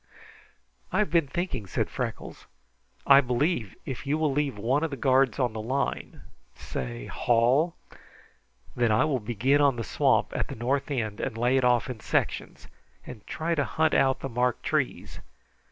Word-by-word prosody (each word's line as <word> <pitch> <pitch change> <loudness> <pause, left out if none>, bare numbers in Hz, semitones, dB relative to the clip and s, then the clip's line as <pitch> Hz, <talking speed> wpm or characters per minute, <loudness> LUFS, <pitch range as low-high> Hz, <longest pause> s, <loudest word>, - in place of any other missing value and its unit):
"I - - 0
have - - +1
been 165 -4 +3
thinking," 140 - -3
said - - -1
Freckles. - - -6 0.6
"I 140 0 +8
believe 125 - -1
if 135 +1 -6
you 145 +2 +1
will 155 -2 +1
leave 140 -4 -1
one 130 +9 0
of 165 - 0
the 140 - -6
guards 130 -1 +3
on 125 -4 0
the 110 - -4
line 135 +5 -3 0.3
say - - -6
Hall 125 +8 +2 1.0
that 120 -1 +2
I 105 +5 +3
will 140 -4 0
begin 120 +6 +1
on 140 -3 +4
the 115 - -4
swamp, - - +1
at - - -1
the - - -7
north 130 +6 -1
end, 110 -6 -2
and 110 - -3
lay 120 +3 +2
it 135 - +2
off 125 -1 +3
in 125 -4 -6
sections, - - -2 0.4
and 110 -5 -11
try 165 +2 -2
to 145 -3 +1
hunt 155 +6 0
out 135 -1 +2
the - - -3
marked 125 0 0
trees. 145 -3 -2
130 Hz, 175 wpm, -27 LUFS, 115-145 Hz, 1.0 s, I